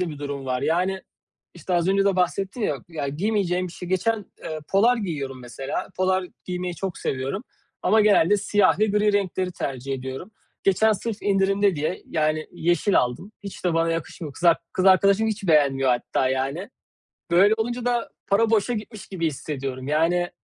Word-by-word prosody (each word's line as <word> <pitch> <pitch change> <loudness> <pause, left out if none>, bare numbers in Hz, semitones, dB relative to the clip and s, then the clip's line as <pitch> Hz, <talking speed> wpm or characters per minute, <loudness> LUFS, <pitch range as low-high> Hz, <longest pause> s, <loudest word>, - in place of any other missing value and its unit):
de 180 - 0
bir 150 -2 -7
durum 140 -2 -5
var, 125 0 -1
yani, 185 +4 0 0.5
işte, 180 - -3
az 175 +1 +2
önce 195 +1 +3
de 195 -2 +2
bahsettim 195 +5 -1
ya 150 - 0
ya 155 -4 -4
giymeyeceğim 185 +2 0
bir - - -11
şey 180 - -8
geçen, 190 +5 +1 0.3
ııı, 155 -1 -4
polar 230 +6 +4
giyiyorum 140 - -4
mesela. 135 +3 -5
Polar 185 0 +1 0.2
giymeyi 180 -1 -3
çok 190 -2 -4
seviyorum 135 - -3 0.4
ama 220 +4 +4
genelde 205 -2 +5
siyah 205 -1 +2
ve 215 - +3
gri 210 0 +2
renkleri 185 -2 0
tercih 135 -4 -4
ediyorum. 130 +9 -6 0.3
Geçen 215 +3 +4
sırf 220 +1 -4
indirimde 195 -1 +2
diye, 155 +5 -2
yani, 155 -1 0
yeşil 175 +4 +2
aldım. 125 - -2
Hiç 200 -2 -9
de 175 -2 +1
bana 165 0 +2
yakışmıyor. 165 -2 -5
Kız 175 - -8
ar 170 -1 +6 0.2
kız 185 - 0
arkadaşım 200 +3 +5
hiç 210 -2 -3
beğenmiyor 135 -4 +4
hatta, 125 +1 0
yani. 135 - -2 0.6
Böyle 195 +5 +6
olunca 240 +2 -2
da 240 -1 0 0.2
para 215 +3 +3
boşa 225 +2 +2
gitmiş 215 -1 -7
gibi 170 -4 -1
hissediyorum. 135 -2 -5
Yani, 170 +4 +2
180 Hz, 175 wpm, -24 LUFS, 150-200 Hz, 0.6 s, ar